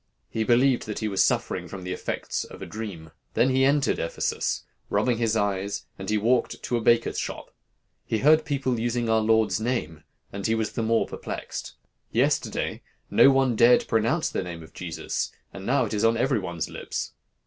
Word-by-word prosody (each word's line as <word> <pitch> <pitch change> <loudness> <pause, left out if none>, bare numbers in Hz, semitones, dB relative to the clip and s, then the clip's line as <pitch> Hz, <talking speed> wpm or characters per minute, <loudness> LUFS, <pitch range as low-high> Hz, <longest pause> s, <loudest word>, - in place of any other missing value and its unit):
He 110 - 0
believed 125 +2 +3
that 105 - -4
he 110 - -1
was 95 -2 +3
suffering - - 0
from 95 -2 -8
the 90 0 -3
effects - - -3
of - - -11
a - - -6
dream. 95 -8 -7 0.2
Then 130 - +4
he 130 +1 +3
entered 140 +1 +2
Ephesus, 85 - -1 0.3
rubbing 115 +3 +1
his 115 -1 +1
eyes, 100 -1 -1
and 95 - -5
he 105 - +2
walked 115 +3 +1
to 120 - -1
a 120 - 0
baker's 115 +1 +3
shop. - - -5 0.5
He 110 - -1
heard 155 +6 +5
people 135 -5 -1
using 120 0 -1
our 110 0 +4
Lord's 110 0 +3
name, 110 -10 -2 0.3
and 100 +1 -2
he 110 - +2
was 110 -1 -1
the - - -3
more 115 0 +2
perplexed. - - -6 0.4
'Yesterday, - - 0 0.3
no - - +7
one 135 -3 +3
dared 120 +2 +5
pronounce 115 +9 +1
the - - -1
name 85 -3 -7
of 80 - -15
Jesus, 85 -3 -3 0.2
and 95 0 -8
now 130 0 +3
it 110 - -5
is 105 0 0
on 115 0 +4
every 130 0 +2
one's 85 -4 -3
lips. - - -5
115 Hz, 190 wpm, -26 LUFS, 100-125 Hz, 0.5 s, no